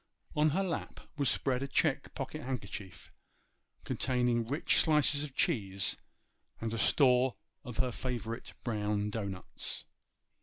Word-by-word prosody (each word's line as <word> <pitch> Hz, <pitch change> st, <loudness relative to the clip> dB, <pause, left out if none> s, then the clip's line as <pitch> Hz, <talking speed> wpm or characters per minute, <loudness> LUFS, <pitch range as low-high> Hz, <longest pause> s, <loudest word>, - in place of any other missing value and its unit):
On 150 Hz, +1 st, +4 dB
her 190 Hz, +7 st, +1 dB
lap 180 Hz, -4 st, -3 dB, 0.2 s
was 140 Hz, -3 st, +2 dB
spread 130 Hz, -1 st, +1 dB
a 140 Hz, -, -2 dB
check 140 Hz, 0 st, +1 dB
pocket 145 Hz, +3 st, -4 dB
handkerchief, 100 Hz, -, -6 dB, 0.7 s
containing 125 Hz, -3 st, +1 dB
rich 145 Hz, +6 st, +2 dB
slices 150 Hz, -2 st, +4 dB
of 140 Hz, -3 st, -7 dB
cheese 100 Hz, -, +2 dB, 0.6 s
and 115 Hz, 0 st, -3 dB
a -, -, -1 dB
store 125 Hz, -3 st, +4 dB, 0.3 s
of 125 Hz, -, -7 dB
her 130 Hz, -1 st, +1 dB
favourite 120 Hz, -2 st, -4 dB
brown 105 Hz, -2 st, 0 dB
dough 105 Hz, -2 st, -2 dB
nuts. 95 Hz, -2 st, -4 dB
125 Hz, 130 wpm, -32 LUFS, 110-140 Hz, 0.7 s, On